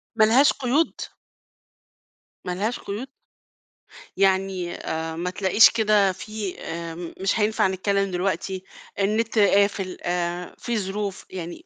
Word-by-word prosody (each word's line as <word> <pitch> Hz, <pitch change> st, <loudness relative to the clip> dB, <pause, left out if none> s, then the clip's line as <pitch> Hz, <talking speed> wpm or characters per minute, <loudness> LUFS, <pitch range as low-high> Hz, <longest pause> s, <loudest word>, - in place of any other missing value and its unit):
ما 220 Hz, -, +5 dB
لهاش 255 Hz, +6 st, +5 dB
قيود؟ 275 Hz, +5 st, 0 dB, 1.4 s
ما 180 Hz, -, -2 dB
لهاش 215 Hz, +6 st, -2 dB
قيود؟ 225 Hz, +7 st, -6 dB, 1.1 s
يعني 190 Hz, -2 st, +1 dB
آآ، 160 Hz, 0 st, -4 dB
ما 175 Hz, +2 st, -2 dB
تلاقيش 190 Hz, +3 st, +5 dB
كده 210 Hz, -3 st, +3 dB
في 205 Hz, 0 st, -6 dB
آمم، 165 Hz, +1 st, -6 dB
مش 195 Hz, +3 st, +1 dB
هينفع 210 Hz, -2 st, +2 dB
نتكلّم 195 Hz, +1 st, 0 dB
دلوقتي، 185 Hz, +1 st, -2 dB, 0.4 s
النت 220 Hz, +3 st, +1 dB
قافل 200 Hz, -2 st, +2 dB
آآ، 175 Hz, 0 st, -2 dB
في 235 Hz, -2 st, -2 dB
ظروف، 200 Hz, 0 st, -3 dB
يعني 180 Hz, -, -7 dB
195 Hz, 120 wpm, -24 LUFS, 180-215 Hz, 1.4 s, ما